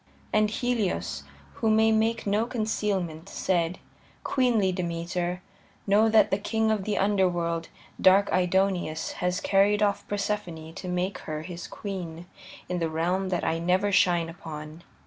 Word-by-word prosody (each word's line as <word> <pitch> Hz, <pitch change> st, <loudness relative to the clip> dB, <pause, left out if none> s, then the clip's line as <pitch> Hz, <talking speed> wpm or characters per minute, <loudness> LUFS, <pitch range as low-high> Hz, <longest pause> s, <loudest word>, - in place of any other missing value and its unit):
And 215 Hz, 0 st, +3 dB
Helios, 195 Hz, -, -1 dB, 0.4 s
who 225 Hz, -, +3 dB
may 220 Hz, +1 st, +4 dB
make 225 Hz, +1 st, +1 dB
no 210 Hz, +3 st, +1 dB
concealment, 200 Hz, -7 st, -2 dB
said: 175 Hz, -1 st, 0 dB, 0.5 s
"Queenly 235 Hz, -8 st, +2 dB
Demeter, 175 Hz, 0 st, -3 dB, 0.4 s
know 210 Hz, +3 st, +4 dB
that 215 Hz, -2 st, +5 dB
the 195 Hz, -, +1 dB
king 220 Hz, +1 st, 0 dB
of 210 Hz, -3 st, -1 dB
the 210 Hz, -, -1 dB
Underworld, 175 Hz, -4 st, +1 dB, 0.3 s
dark 195 Hz, +2 st, +6 dB
Aidoneus, 180 Hz, -3 st, +1 dB
has 180 Hz, +1 st, 0 dB
carried 205 Hz, +2 st, +3 dB
off 200 Hz, -1 st, 0 dB
Persephone 190 Hz, -6 st, -3 dB
to 185 Hz, -, -7 dB
make 180 Hz, +2 st, -2 dB
her 155 Hz, 0 st, -3 dB
his 175 Hz, 0 st, -7 dB
queen 175 Hz, -5 st, -6 dB, 0.4 s
in 180 Hz, -1 st, -2 dB
the 165 Hz, -1 st, 0 dB
realm 180 Hz, +4 st, 0 dB
that 175 Hz, -2 st, -1 dB
I 165 Hz, 0 st, 0 dB
never 185 Hz, +4 st, +1 dB
shine 175 Hz, -3 st, +3 dB
upon." 155 Hz, -1 st, -8 dB
185 Hz, 145 wpm, -27 LUFS, 170-210 Hz, 0.5 s, dark